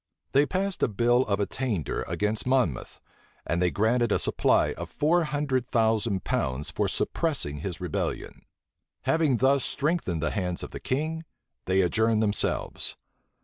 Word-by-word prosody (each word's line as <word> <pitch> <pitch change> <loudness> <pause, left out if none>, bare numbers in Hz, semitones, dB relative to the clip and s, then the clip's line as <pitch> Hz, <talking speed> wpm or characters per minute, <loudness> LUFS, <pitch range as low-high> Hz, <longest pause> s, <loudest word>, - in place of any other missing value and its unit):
They 140 +2 +4
passed 195 +1 -2
a - - +4
bill 120 +3 +3
of 100 -1 0
attainder 105 - -2
against 105 +3 -1
Monmouth; 125 - 0 0.5
and 85 +1 0
they 90 - +3
granted 115 +4 +1
a - - +4
supply - - +2
of - - -7
four 165 +3 +2
hundred 145 -4 0
thousand 110 -4 +1
pounds 65 +3 -1
for - - 0
suppressing 145 - -1
his 85 +1 -5
rebellion. - - -4 0.6
Having 160 -6 +2
thus 135 +2 +3
strengthened 150 - -1
the 75 - 0
hands 90 -4 -2
of - - -7
the - - -6
king, 155 +5 -2 0.4
they 95 +1 +3
adjourned 110 +5 +2
themselves. 105 -1 -1
115 Hz, 145 wpm, -27 LUFS, 95-140 Hz, 0.6 s, They